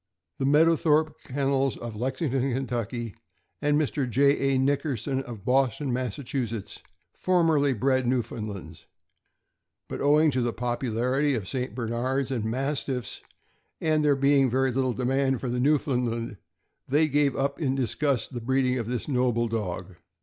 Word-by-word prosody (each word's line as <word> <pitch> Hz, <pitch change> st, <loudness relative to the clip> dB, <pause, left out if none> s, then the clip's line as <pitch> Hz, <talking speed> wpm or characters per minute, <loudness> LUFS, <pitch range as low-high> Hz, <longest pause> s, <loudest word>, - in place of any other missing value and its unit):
The 135 Hz, -, +1 dB
Mead 150 Hz, +3 st, +6 dB
owthorpe 155 Hz, -1 st, +3 dB
Kennels, 135 Hz, 0 st, 0 dB
of 115 Hz, -2 st, -7 dB
Lexington, 130 Hz, +1 st, -1 dB
Ky., 120 Hz, -2 st, -3 dB, 0.5 s
and 145 Hz, 0 st, +2 dB
Mr. 140 Hz, -3 st, -1 dB
J. 135 Hz, +1 st, +3 dB
A. -, -, +3 dB
Nick 135 Hz, +2 st, +2 dB
erson, 135 Hz, -2 st, -2 dB
of 115 Hz, -7 st, -9 dB
Boston, 130 Hz, +1 st, +1 dB
Mass., 125 Hz, -2 st, -2 dB, 0.9 s
formerly 160 Hz, -6 st, +2 dB
bred 130 Hz, +2 st, +1 dB
Newfoundlands, 110 Hz, -5 st, -4 dB, 1.0 s
but -, -, -5 dB
owing 150 Hz, +2 st, +4 dB
to 130 Hz, -1 st, 0 dB
the 120 Hz, -1 st, 0 dB
popularity 125 Hz, +3 st, 0 dB
of 105 Hz, -6 st, -4 dB
St. 125 Hz, -2 st, -3 dB
Bernards 125 Hz, +3 st, -1 dB
and 115 Hz, -5 st, -1 dB
Mastiffs, 130 Hz, +1 st, -2 dB, 0.6 s
and 155 Hz, -1 st, +1 dB
there 145 Hz, -1 st, +4 dB
being 140 Hz, -1 st, +3 dB
very 130 Hz, +2 st, +1 dB
little 130 Hz, 0 st, 0 dB
demand 130 Hz, +1 st, +1 dB
for 130 Hz, -, -3 dB
the 125 Hz, +1 st, -1 dB
Newfoundland, 125 Hz, -6 st, 0 dB, 0.5 s
they 150 Hz, +4 st, +3 dB
gave 145 Hz, -1 st, +2 dB
up 140 Hz, +3 st, -1 dB
in 135 Hz, -3 st, +1 dB
disgust 135 Hz, +1 st, -1 dB
the 120 Hz, -, -4 dB
breeding 130 Hz, +1 st, +1 dB
of 115 Hz, -, -4 dB
this 120 Hz, -1 st, -3 dB
noble 125 Hz, -4 st, +1 dB
dog. 95 Hz, -5 st, -4 dB
130 Hz, 145 wpm, -26 LUFS, 120-140 Hz, 1.0 s, Mead